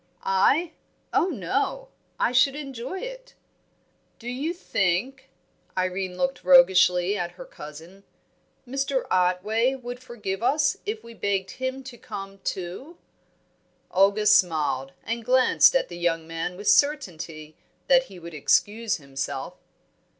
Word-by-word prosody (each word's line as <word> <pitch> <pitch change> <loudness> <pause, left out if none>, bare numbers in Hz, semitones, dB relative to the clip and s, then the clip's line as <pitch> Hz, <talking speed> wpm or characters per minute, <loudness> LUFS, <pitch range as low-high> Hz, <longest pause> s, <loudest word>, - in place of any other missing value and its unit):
"I? 275 - +2 0.4
Oh, 350 - +3
no! 380 - -2 0.3
I - - +2
should 260 +2 +4
enjoy 275 +4 -6
it." - - -9 0.8
"Do 235 - -11
you 265 +7 -2
think" 260 - -1 0.5
Irene 185 0 -2
looked 270 0 -1
roguishly 190 -8 +5
at 175 -3 -3
her - - -10
cousin 160 +6 -12 0.6
"Mr. 270 +1 -1
Otway 205 +8 +2
would 245 -1 -7
forgive 215 -6 -5
us 290 +8 +2
if 430 +1 -3
we 235 - -11
begged 195 -3 -2
him 260 +1 -4
to 255 -2 -11
come, 195 -4 -8
too?" 190 - -5 0.9
Olga 200 +3 +3
smiled, 155 -9 +3
and 230 +1 -3
glanced 255 - +5
at - - +2
the 175 - -9
young 165 -2 0
man 165 +2 -4
with 205 +1 -7
certainty 180 - +1 0.3
that 265 -1 +5
he 195 -7 -13
would 170 -1 -10
excuse 210 +9 +1
himself. 135 -3 -5
210 Hz, 130 wpm, -25 LUFS, 180-265 Hz, 0.9 s, roguishly